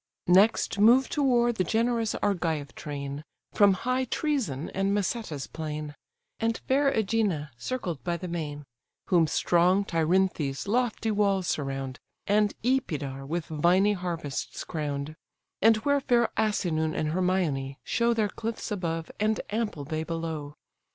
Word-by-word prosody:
Next 200 Hz, +3 st, +4 dB
move 245 Hz, +5 st, +6 dB
to 295 Hz, -, -1 dB
war 240 Hz, -3 st, +3 dB
the 190 Hz, -, 0 dB
generous 230 Hz, +3 st, 0 dB
Argive 165 Hz, -8 st, -1 dB
train, 140 Hz, 0 st, -6 dB, 0.3 s
From 200 Hz, -2 st, +6 dB
high 255 Hz, +6 st, -1 dB
Trœzenè, 230 Hz, -, -1 dB
and 195 Hz, +1 st, +1 dB
Maseta's 200 Hz, -, -2 dB
plain, 150 Hz, -1 st, -5 dB, 0.5 s
And 225 Hz, 0 st, 0 dB
fair 275 Hz, +1 st, +3 dB
Ægina 200 Hz, -, 0 dB
circled 175 Hz, -, -4 dB
by 170 Hz, +3 st, -1 dB
the 180 Hz, -, -6 dB
main: 150 Hz, -4 st, -4 dB, 0.4 s
Whom 170 Hz, -3 st, +4 dB
strong 180 Hz, +5 st, +3 dB
Tyrinthe's 165 Hz, -4 st, 0 dB
lofty 225 Hz, 0 st, 0 dB
walls 200 Hz, -3 st, +2 dB
surround, 135 Hz, -2 st, -3 dB, 0.3 s
And 205 Hz, 0 st, +2 dB
Epidaure 145 Hz, -, -1 dB
with 170 Hz, +2 st, -2 dB
viny 180 Hz, +6 st, +3 dB
harvests 170 Hz, -6 st, -4 dB
crown'd: 150 Hz, -1 st, -4 dB, 0.5 s
And 225 Hz, +1 st, +6 dB
where 285 Hz, -1 st, +3 dB
fair 240 Hz, -3 st, +3 dB
Asinen 165 Hz, -7 st, 0 dB
and 155 Hz, -, 0 dB
Hermoin 165 Hz, -6 st, 0 dB
show 235 Hz, 0 st, +1 dB
Their 215 Hz, -2 st, +1 dB
cliffs 225 Hz, +2 st, -5 dB
above, 165 Hz, -5 st, -3 dB
and 215 Hz, +1 st, +1 dB
ample 210 Hz, -10 st, -2 dB
bay 155 Hz, +2 st, -2 dB
below. 160 Hz, -3 st, -4 dB
185 Hz, 135 wpm, -27 LUFS, 155-220 Hz, 0.5 s, move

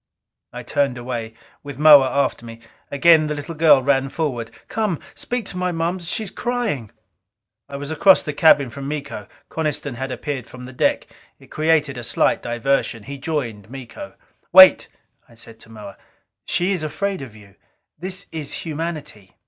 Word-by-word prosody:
I 125 Hz, +1 st, -8 dB
turned 135 Hz, 0 st, 0 dB
away, 120 Hz, -2 st, -5 dB, 0.3 s
with 140 Hz, -3 st, -9 dB
Moa 145 Hz, -3 st, +7 dB
after 140 Hz, -3 st, -1 dB
me. 115 Hz, -1 st, -10 dB, 0.3 s
Again 155 Hz, +2 st, +4 dB
the 150 Hz, -, -2 dB
little 145 Hz, +3 st, -6 dB
girl 155 Hz, -4 st, +5 dB
ran 135 Hz, 0 st, +1 dB
forward. 130 Hz, -8 st, -3 dB, 0.2 s
"Come... 210 Hz, -7 st, -2 dB
speak 245 Hz, -3 st, -4 dB
to 180 Hz, -, -6 dB
my 180 Hz, 0 st, -1 dB
Moms; 170 Hz, +1 st, -3 dB
she 220 Hz, -, -1 dB
is 200 Hz, -, -8 dB
crying." 235 Hz, -, -3 dB, 0.8 s
It 140 Hz, -, -5 dB
was 145 Hz, +2 st, -6 dB
across 185 Hz, +5 st, +5 dB
the 150 Hz, -, -4 dB
cabin 145 Hz, -4 st, +4 dB
from 140 Hz, +1 st, -7 dB
Miko. 140 Hz, -8 st, -6 dB, 0.2 s
Coniston 150 Hz, -3 st, -3 dB
had 130 Hz, +2 st, -5 dB
appeared 140 Hz, -5 st, -5 dB
from 125 Hz, 0 st, -11 dB
the 130 Hz, +1 st, -10 dB
deck; -, -, 0 dB, 0.3 s
it -, -, -20 dB
created 155 Hz, -4 st, +1 dB
a -, -, -8 dB
slight 115 Hz, -, +1 dB
diversion. 120 Hz, -1 st, -1 dB
He 140 Hz, +3 st, -8 dB
joined 125 Hz, -9 st, -4 dB
Miko. 135 Hz, -, -10 dB, 0.4 s
"Wait," 190 Hz, 0 st, +8 dB, 0.4 s
I 115 Hz, -, -19 dB
said 115 Hz, 0 st, -12 dB
to -, -, -14 dB
Moa. 105 Hz, -3 st, -11 dB, 0.5 s
"She 180 Hz, +3 st, 0 dB
is 185 Hz, -4 st, -1 dB
afraid 195 Hz, +5 st, -3 dB
of 125 Hz, -5 st, -10 dB
you. 100 Hz, -2 st, -16 dB, 0.5 s
This 185 Hz, +2 st, -6 dB
is 155 Hz, -3 st, -5 dB
humanity." 150 Hz, -, -6 dB
145 Hz, 170 wpm, -21 LUFS, 125-165 Hz, 0.8 s, Wait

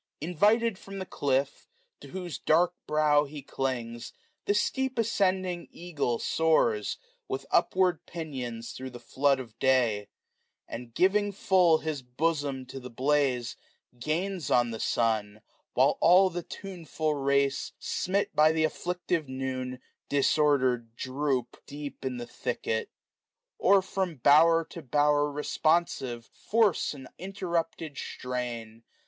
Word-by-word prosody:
Invited 205 Hz, +6 st, +2 dB
from 195 Hz, 0 st, -9 dB
the 190 Hz, -, -4 dB
clifi^, 135 Hz, -4 st, -1 dB, 0.3 s
to -, -, -12 dB
whose 180 Hz, -3 st, -6 dB
dark 175 Hz, +3 st, +3 dB
brow 150 Hz, -1 st, +3 dB
He 145 Hz, 0 st, -9 dB
clings, 120 Hz, -4 st, -4 dB, 0.3 s
the 205 Hz, -, +2 dB
steep 265 Hz, +5 st, 0 dB
ascending 185 Hz, -5 st, 0 dB
eagle 155 Hz, -9 st, -2 dB
soars. 120 Hz, -11 st, +1 dB, 0.3 s
With 135 Hz, +1 st, -4 dB
upward 180 Hz, -1 st, +2 dB
pinions 125 Hz, -8 st, -5 dB
thro* 130 Hz, 0 st, -7 dB
the 120 Hz, -1 st, -10 dB
flood 135 Hz, +3 st, +1 dB
of 115 Hz, -4 st, -10 dB
day; 120 Hz, -6 st, +2 dB, 0.6 s
And, 120 Hz, 0 st, -7 dB
giving 205 Hz, +2 st, +3 dB
full 185 Hz, -4 st, +4 dB
his 155 Hz, -3 st, -4 dB
bosom 140 Hz, +1 st, -1 dB
to 130 Hz, +1 st, -8 dB
the 125 Hz, -1 st, -9 dB
blaze, 130 Hz, -1 st, +1 dB, 0.4 s
610 165 Hz, +10 st, -2 dB
Gdns 150 Hz, -, +1 dB
on 120 Hz, -1 st, +1 dB
the 110 Hz, -, -5 dB
sun*; 110 Hz, -2 st, 0 dB, 0.3 s
while 135 Hz, +3 st, +3 dB
all 185 Hz, +2 st, +6 dB
the 175 Hz, 0 st, -3 dB
tuneful 165 Hz, -5 st, -4 dB
race, 140 Hz, -1 st, +1 dB
Smit 195 Hz, +2 st, -1 dB
by 155 Hz, +1 st, +6 dB
the 160 Hz, 0 st, +1 dB
aflHictive 175 Hz, -1 st, -1 dB
noon, 130 Hz, -1 st, -4 dB, 0.3 s
disordered 130 Hz, -5 st, +2 dB
droop. 130 Hz, -1 st, -2 dB
Deep 145 Hz, -1 st, -8 dB
in 130 Hz, -2 st, -3 dB
the 120 Hz, -, -5 dB
thicket; 115 Hz, -2 st, -3 dB, 0.7 s
or, 195 Hz, 0 st, +5 dB
from 190 Hz, -3 st, -2 dB
bower 160 Hz, +5 st, +5 dB
to 170 Hz, -, -7 dB
bower 145 Hz, +1 st, +2 dB
Responsive, 145 Hz, -5 st, 0 dB
force 215 Hz, -, +1 dB
an 135 Hz, -2 st, -10 dB
interrujpted 170 Hz, -5 st, -3 dB
strain. 120 Hz, -3 st, -5 dB
145 Hz, 130 wpm, -28 LUFS, 125-175 Hz, 0.7 s, all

